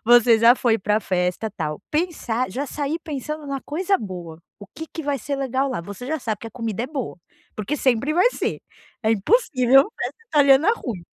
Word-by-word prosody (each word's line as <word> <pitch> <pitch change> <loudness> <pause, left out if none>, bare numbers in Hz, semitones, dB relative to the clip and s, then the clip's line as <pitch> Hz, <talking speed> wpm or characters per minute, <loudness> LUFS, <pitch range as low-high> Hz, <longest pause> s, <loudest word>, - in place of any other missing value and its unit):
Você 240 -1 +6
já 230 +2 +7
foi 230 -3 +1
pra 210 +2 +1
festa, 180 +2 -1
tal. 155 -6 -4
Pensar 290 - -1
já 275 +8 -3
sair 295 +4 -3
pensando 305 0 -5
numa 275 -1 -3
coisa 370 +6 0
boa. 175 -5 -7 0.2
"O 205 - -11
que 320 - -7
que 325 - -5
vai 285 -2 -1
ser 280 +4 -3
legal 270 0 0
lá?" 250 -9 -3
Você 205 +7 -8
já 315 +2 -1
sabe 220 -5 -3
que - - -7
a - - -19
comida 230 -3 -3
é 250 - -2
boa. 270 - -5 0.4
Porque 215 +8 -3
sempre 265 +2 +1
vai 370 +9 +4
ser. - - -3 0.4
É 220 - +2
impossível 270 - +4
festa - - -4
italiana 290 +5 +5
ruim. 220 - -6
255 Hz, 200 wpm, -23 LUFS, 220-290 Hz, 0.4 s, já